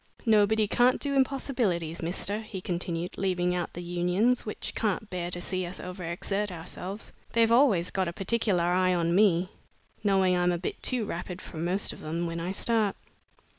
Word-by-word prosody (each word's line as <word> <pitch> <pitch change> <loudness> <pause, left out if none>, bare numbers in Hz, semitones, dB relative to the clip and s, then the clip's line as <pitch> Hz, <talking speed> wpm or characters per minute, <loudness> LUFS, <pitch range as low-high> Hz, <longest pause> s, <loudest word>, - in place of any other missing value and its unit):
Nobody 215 -1 +4
can't 245 +4 +3
do 285 -1 -1
impossibilities, 245 - 0
mister," 190 +5 -1
he 215 -3 -7
continued, 175 -1 -3
"leaving 180 -2 +1
out 175 -2 -2
the 175 - -6
Unions, 180 +8 +1
which 210 - -4
can't 215 -1 -1
bear 175 -1 -3
to 175 - -5
see 185 +1 -2
us 175 +1 -5
over 180 0 -7
exert 195 +4 -2
ourselves. 180 +4 -6 0.2
They've 230 -1 +4
always 230 -9 +4
got 190 -2 0
a - - -1
particular 195 -2 +1
eye 180 +1 +3
on 170 -1 +1
me, 185 -1 +3 0.5
knowing 190 -3 +3
I'm 180 0 +2
a 175 - 0
bit 175 - -5
too 250 -4 +1
rapid 175 0 -5
for 165 - -10
most 180 +5 0
of - - -12
them 165 +3 -3
when 165 0 -3
I 175 +2 -2
start." 215 0 +2
185 Hz, 180 wpm, -28 LUFS, 175-215 Hz, 0.5 s, Nobody